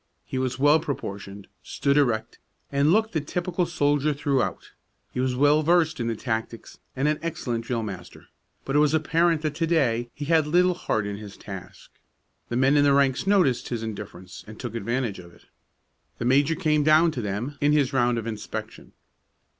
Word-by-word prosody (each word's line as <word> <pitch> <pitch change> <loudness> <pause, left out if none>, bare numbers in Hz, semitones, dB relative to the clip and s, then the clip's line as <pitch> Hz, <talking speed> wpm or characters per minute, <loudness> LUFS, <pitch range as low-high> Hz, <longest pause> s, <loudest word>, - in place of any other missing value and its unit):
He 130 - -4
was 130 -1 -2
well 145 +3 +5
proportioned, 100 -9 -6 0.2
stood 140 0 -1
erect, 120 -7 +1 0.3
and 140 +2 +3
looked 220 +3 +2
the 160 - 0
typical 175 +3 -2
soldier 145 -2 +1
throughout. 140 -2 -1 0.4
He - - -3
was 130 0 0
well 145 +3 +4
versed 165 -1 +2
in 115 - -1
the 115 - -1
tactics 115 0 -5 0.2
and 135 +3 0
an 150 0 +1
excellent 120 -8 -3
drill 120 -2 -2
master, 95 -4 -8 0.4
but 135 - -2
it - - +5
was 150 +1 +3
apparent 165 +1 +2
that 155 -2 -1
to 165 +2 -1
day 120 -8 +1
he 145 - -5
had 160 -1 +3
little 180 +3 +3
heart 110 -10 -2
in 100 0 -4
his 105 -2 -10
task. 95 -3 -10 0.6
The 120 - -1
men 135 +3 +4
in 145 - +5
the 140 -1 +4
ranks 140 +4 +2
noticed 180 -12 +2
his 115 -2 -3
indifference, 100 -4 -8
and 110 0 -11
took 120 -3 -5
advantage 115 -1 -2
of 85 -1 -13
it. - - -23 0.7
The 120 - -4
major 140 +5 +3
came 150 -2 +1
down 155 +3 +5
to 125 - -4
them 110 +8 -4
in 145 +1 +3
his 145 -2 +2
round 120 -2 +2
of 115 - -4
inspection. 110 -2 -7
140 Hz, 190 wpm, -25 LUFS, 115-155 Hz, 0.7 s, well